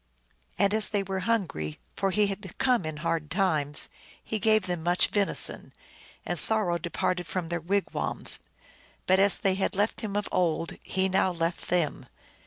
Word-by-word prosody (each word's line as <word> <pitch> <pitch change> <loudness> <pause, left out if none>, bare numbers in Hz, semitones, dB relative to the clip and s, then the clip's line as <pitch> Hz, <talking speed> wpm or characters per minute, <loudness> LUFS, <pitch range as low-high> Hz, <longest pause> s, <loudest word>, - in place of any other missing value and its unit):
And 200 0 +2
as 215 0 +3
they 205 -2 0
were 190 0 -3
hungry 80 - -1 0.2
for 195 - 0
he 210 +2 +3
had 195 -2 -5
come 250 -9 +2
in 155 -1 -4
hard 155 -2 -1
times 155 -6 +1 0.4
he 220 - -2
gave 215 -2 +3
them 175 -3 -3
much 175 +2 +2
venison, 205 -2 +2 0.5
and - - 0
sor 220 -1 +5
row 175 -1 0
departed 175 +1 -2
from 170 +1 -3
their 170 0 -2
wigwams. 195 +4 0 0.7
But 185 +1 +4
as 200 0 +4
they 195 - +1
had 190 0 -1
left 205 +3 0
him 210 -3 -4
of 205 0 -1
old, 165 -2 0
he 190 0 -1
now 190 0 +2
left 170 0 -3
them. 175 -4 0
190 Hz, 175 wpm, -27 LUFS, 170-200 Hz, 0.7 s, sor